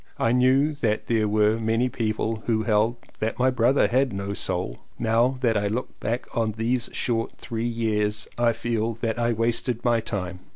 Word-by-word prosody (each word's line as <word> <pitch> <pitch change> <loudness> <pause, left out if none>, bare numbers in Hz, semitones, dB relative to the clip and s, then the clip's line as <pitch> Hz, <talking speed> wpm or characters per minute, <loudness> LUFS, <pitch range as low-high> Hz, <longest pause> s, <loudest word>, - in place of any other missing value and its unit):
I 115 - +2
knew 130 +4 +3
that 115 -7 -1
there 110 -2 +1
were 105 +1 +2
many 115 +2 +1
people 110 -2 -2
who 110 -2 +1
held 110 +1 +2 0.2
that 110 +1 -2
my 130 +1 +3
brother 125 +2 +3
had 130 +2 +2
no 100 +1 -3
Soul. - - -3 0.2
Now 120 +3 +2
that 115 -3 +2
I 105 0 +1
look 115 +5 -4
back 115 +3 -2
on 110 -2 0
those 115 +3 -1
short 115 -2 -1
three 115 0 -3
years 110 -2 -1
I 120 -1 +3
feel 115 0 -2
that 115 0 -1
I 120 0 +2
wasted 115 +1 0
my 120 -1 +3
time. 95 -5 -4
115 Hz, 180 wpm, -25 LUFS, 110-120 Hz, 0.2 s, knew